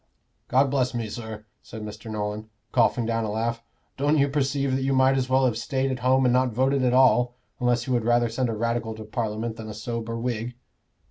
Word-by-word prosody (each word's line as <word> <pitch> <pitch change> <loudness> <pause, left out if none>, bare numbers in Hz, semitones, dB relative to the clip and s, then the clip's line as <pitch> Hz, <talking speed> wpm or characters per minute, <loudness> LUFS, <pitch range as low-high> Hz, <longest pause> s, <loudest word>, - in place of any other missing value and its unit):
"God 135 +1 +3
bless 130 -3 +1
me, 115 -2 -2
sir," 110 -1 -7 0.2
said 110 -1 -9
Mr. 105 +2 -8
Nolan, 105 0 -4 0.2
coughing 120 -1 +2
down 115 0 0
a 110 - -2
laugh, 115 +2 -2 0.4
"don't 145 +3 +2
you 140 0 +3
perceive 140 -1 0
that 135 - -1
you 135 +1 +1
might 130 0 +4
as 130 -1 -1
well 130 0 +4
have 120 -3 0
stayed 135 +2 -1
at 130 - -3
home 130 +1 +3
and 125 - +4
not 125 -1 +2
voted 135 +3 +2
at 125 - +3
all, 125 -1 +4 0.2
unless 120 -1 +1
you 130 - -1
would 120 -2 +1
rather 120 +1 +3
send 120 +2 -1
a - - -1
Radical 115 0 -1
to 110 - -8
Parliament 110 0 -3
than 110 -1 -7
a 105 - -7
sober 115 +1 -4
Whig?" 120 0 -3
120 Hz, 220 wpm, -25 LUFS, 110-130 Hz, 0.4 s, might